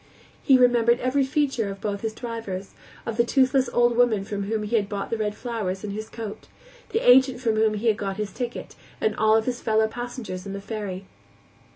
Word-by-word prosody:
He 270 -3 +5
remembered 240 -1 +4
every 260 +2 +1
feature 265 -5 0
of 195 0 -7
both 200 -1 -3
his 220 -1 -3
drivers, 225 -5 -6 0.3
of 230 -1 -4
the 235 - +5
toothless 260 +1 +2
old 240 0 +3
woman 230 -5 +3
from 200 -1 -3
whom 215 +1 -1
he 210 +3 -1
had 205 -3 +1
bought 200 -1 -4
the 230 - 0
red 210 -1 -1
flowers 210 -6 -4
in 210 - -4
his 215 +2 -6
coat, 220 -2 -7 0.4
the 450 - -1
agent 260 0 +6
from 230 -4 0
whom 215 0 +2
he 210 +3 -4
had 220 -3 +3
got 195 -2 -3
his 210 -2 -3
ticket, 245 -1 -5 0.3
and 215 - 0
all 220 0 +4
of 220 - 0
his 245 -1 -2
fellow 220 0 +2
passengers 235 -5 -6
on 195 - -5
the 200 - -4
ferry. 200 -2 -5
220 Hz, 215 wpm, -25 LUFS, 205-245 Hz, 0.4 s, agent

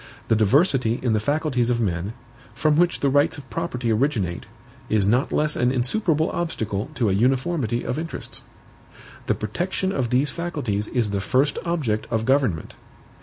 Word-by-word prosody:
The 110 - +4
diversity 125 - +3
in 120 -3 +2
the 110 - +2
faculties 140 -1 0
of 120 -1 +1
men, 95 -1 -1 0.4
from 155 -1 +2
which 175 +2 +2
the 140 - +3
rights 145 +3 +3
of 140 -2 -11
property 125 -8 -2
originate, 110 -7 0 0.4
is 105 -2 +2
not 120 +7 +2
less 150 0 +2
an 125 +1 +2
insuperable 155 - +1
obstacle 110 -9 -3
to 120 -5 +1
a - - +2
uniformity 125 - +1
of 125 - -2
interests. 165 +1 -4 0.9
The - - +2
protection 175 - -2
of 130 -9 -1
these 130 +4 +2
faculties 135 -12 -2
is 115 -5 -1
the 100 -1 -1
first 130 - +1
object 140 -11 -1
of 115 -1 -1
government. 130 - +1
125 Hz, 165 wpm, -23 LUFS, 110-150 Hz, 0.9 s, The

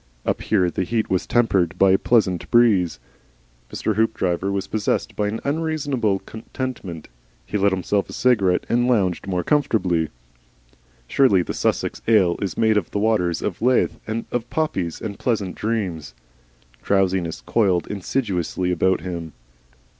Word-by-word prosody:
Up - - -1
here 90 -5 +1
the 95 - -1
heat 110 +4 -1
was 95 - 0
tempered 100 -8 +2
by 95 -1 +5
a 95 - +5
pleasant 100 -7 +1
breeze. 100 - +3 0.7
Mr. 110 - -1
Hoopdriver 95 -4 0
was 100 0 -2
possessed 105 0 -1
by 105 +1 -1
unreasonable 140 -8 0
contentment; 110 - -6 0.4
he - - -7
lit 100 0 +3
himself 95 +2 -1
a - - -8
cigarette 100 -8 +2
and 120 +1 +2
lounged 100 -7 +1
more 90 -2 -1
comfortably. 90 - +1 1.0
Surely 100 - +4
the - - -5
Sussex - - -1
ale 100 -6 +4
is 100 -3 -3
made 110 -1 +3
of 95 - -1
the - - -4
waters 100 -6 +1
of 90 - -3
Lethe, 125 +2 +2 0.3
of 120 -1 -3
poppies 95 - -2
and 100 -2 -6
pleasant 105 -7 -1
dreams. 95 - -3 0.7
Drowsiness 95 -4 0
coiled 95 -7 +1
insidiously 95 -4 -2
about 95 +2 +1
him. 85 -4 -6
100 Hz, 140 wpm, -22 LUFS, 90-115 Hz, 1.0 s, by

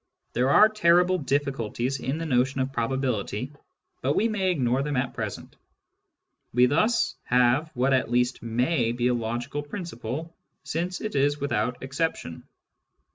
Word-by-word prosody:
There 125 +2 +2
are 210 +9 +7
terrible 180 -3 +3
difficulties 135 -3 -1
in 135 +4 -2
the 165 - -4
notion 130 -1 +1
of 130 +1 -1
probability, 125 0 -2 0.5
but 140 +3 +1
we 225 - +3
may 195 -4 0
ignore 130 -6 +1
them 145 -1 -2
at 125 0 -1
present. - - -6 1.0
We 125 +1 +5
thus 215 - +2
have 125 +5 +3
what 130 +2 +2
at 130 -3 +1
least 125 +1 +1
may 120 +2 0
be 120 +1 +1
a - - +2
logical 120 +4 -3
principle, 150 - -6 0.3
since 175 +2 -3
it 215 - -4
is 145 +1 +1
without 125 -3 -1
exception. 140 - -3
135 Hz, 145 wpm, -26 LUFS, 125-160 Hz, 1.0 s, are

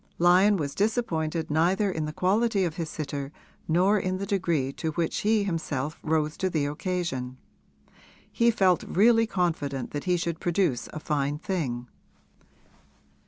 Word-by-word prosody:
Lyon 185 +4 +5
was 145 -4 -3
disappointed 170 -8 -1
neither 185 +6 +2
in 160 -3 -2
the 150 - -4
quality 200 +5 +1
of 170 -1 -2
his 165 -3 -3
sitter 140 -2 -5 0.4
nor 185 +6 +3
in 185 0 -2
the 200 - -3
degree 170 -9 0
to 160 - -3
which 165 +1 -1
he 215 0 +2
himself 155 -6 -3
rose 155 -1 0
to 190 - 0
the 155 -5 0
occasion; 145 -5 -3 0.9
he 235 -1 +3
felt 190 -6 +3
really 225 +3 +3
confident 155 - -2
that 145 - -4
he 180 -1 +2
should 170 -1 -3
produce 175 -7 0
a 155 - -6
fine 145 -1 -1
thing. 145 -9 -3
170 Hz, 150 wpm, -27 LUFS, 150-190 Hz, 0.9 s, Lyon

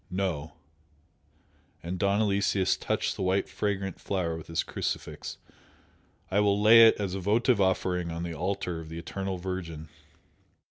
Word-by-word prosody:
"No, 90 -5 -2 0.7
" - - -37
and 90 +2 -4
Don 100 +1 +2
Aloysius 100 -2 +2
touched - - -1
the - - -6
white 95 +1 +1
fragrant 100 -3 -3
flower 90 -4 -1
with 80 - -9
his 80 - -1
crucifix - - -4 0.9
"I 100 - +3
will 100 -1 +3
lay 115 +2 +9
it - - +4
as 100 -3 -2
a 95 - -2
votive 110 +4 +2
offering 90 -2 +1
on 85 +1 -4
the 85 -1 -4
altar 90 -1 -2
of 80 -1 -9
the 80 - -7
Eternal 95 +3 -4
Virgin!" 85 -4 -5
95 Hz, 155 wpm, -28 LUFS, 85-100 Hz, 0.9 s, lay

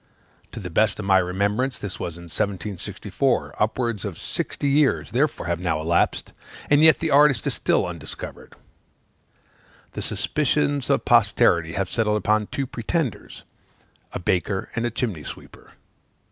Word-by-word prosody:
To - - -7
the 90 -4 -7
best 105 +5 +2
of 105 - -5
my 95 -1 +5
remembrance, 100 +8 0
this 90 -4 -6
was 85 -1 -5
in 85 - -11
1764; 100 - -2
upwards 115 -1 0
of 100 -5 -5
sixty 145 - -3
years, 135 - +2
therefore, - - 0
have 85 0 -1
now 85 -4 -1
elapsed, 85 +2 0 0.4
and 145 0 +6
yet 160 -1 +7
the 165 -2 -2
artist 140 -4 +5
is - - 0
still - - +1
undiscovered. 85 -3 -8 1.4
The - - -6
suspicions 145 -2 0
of - - +2
posterity 85 -1 +3
have 95 0 -1
settled 105 +1 +1
upon 105 0 +1
two 140 - -3
pretenders 130 - -3 0.7
a - - -4
baker 95 +2 -1
and 120 0 0
a - - -1
chimney 110 -9 -3
sweeper. - - -11
105 Hz, 145 wpm, -23 LUFS, 90-130 Hz, 1.4 s, yet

